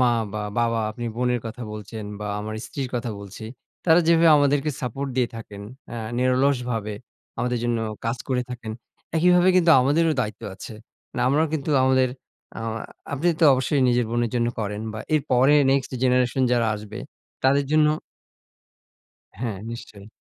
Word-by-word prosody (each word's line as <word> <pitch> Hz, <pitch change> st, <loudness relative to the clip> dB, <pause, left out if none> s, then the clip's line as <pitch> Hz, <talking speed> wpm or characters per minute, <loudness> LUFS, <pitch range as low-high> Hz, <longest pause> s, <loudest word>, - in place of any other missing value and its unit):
মা 125 Hz, -1 st, +4 dB, 0.2 s
বা 110 Hz, -, -3 dB, 0.2 s
বাবা, 115 Hz, -1 st, +1 dB
আপনি 120 Hz, +1 st, -7 dB
বোনের 125 Hz, -1 st, +1 dB
কথা 115 Hz, +2 st, -7 dB
বলছেন 105 Hz, +1 st, -7 dB, 0.2 s
বা 105 Hz, -, -4 dB
আমার 110 Hz, +1 st, -5 dB
স্ত্রীর 135 Hz, -3 st, -4 dB
কথা 120 Hz, -1 st, -2 dB
বলছি, 100 Hz, +2 st, -9 dB, 0.4 s
তারা 165 Hz, 0 st, +6 dB
যেভাবে 165 Hz, 0 st, +5 dB
আমাদেরকে 145 Hz, +1 st, +2 dB
সাপোর্ট 135 Hz, +3 st, -3 dB
দিয়ে 125 Hz, -2 st, +2 dB
থাকেন, 105 Hz, -3 st, -9 dB, 0.3 s
অ্যা 120 Hz, -, -6 dB, 0.2 s
নিরলসভাবে 125 Hz, -4 st, +1 dB, 0.4 s
আমাদের 125 Hz, 0 st, 0 dB
জন্য 120 Hz, -1 st, +1 dB, 0.3 s
কাজ 115 Hz, +2 st, 0 dB
করে 125 Hz, -1 st, +1 dB
থাকেন, 115 Hz, -3 st, -6 dB, 0.4 s
একইভাবে 180 Hz, +2 st, +5 dB
কিন্তু 170 Hz, -2 st, +4 dB
আমাদেরও 155 Hz, +5 st, +3 dB
দায়িত্ব 110 Hz, 0 st, -4 dB
আছে। 110 Hz, -, -9 dB, 0.4 s
মানে 125 Hz, -, -2 dB
আমরাও 150 Hz, +4 st, +3 dB
কিন্তু 155 Hz, 0 st, -2 dB
আমাদের 130 Hz, -1 st, +3 dB, 0.5 s
আমা 115 Hz, 0 st, -4 dB, 0.3 s
আপনি 145 Hz, +5 st, +1 dB
তো 165 Hz, -, +6 dB
অবশ্যই 130 Hz, +2 st, +1 dB
নিজের 120 Hz, 0 st, +2 dB
বোনের 120 Hz, -1 st, 0 dB
জন্য 120 Hz, 0 st, +1 dB
করেন 105 Hz, 0 st, -3 dB
বা 110 Hz, -, -6 dB
এর 155 Hz, -, +3 dB
পরে 130 Hz, +4 st, +5 dB, 0.2 s
next 135 Hz, -1 st, +1 dB
generation 125 Hz, 0 st, +2 dB
যারা 120 Hz, -2 st, +2 dB
আসবে, 105 Hz, +2 st, -9 dB, 0.5 s
তাদের 140 Hz, +2 st, +4 dB
জন্য। 155 Hz, -1 st, +5 dB, 1.5 s
হ্যাঁ, 115 Hz, -5 st, -2 dB
নিশ্চয়ই। 105 Hz, -3 st, -9 dB
125 Hz, 155 wpm, -24 LUFS, 115-140 Hz, 1.5 s, তারা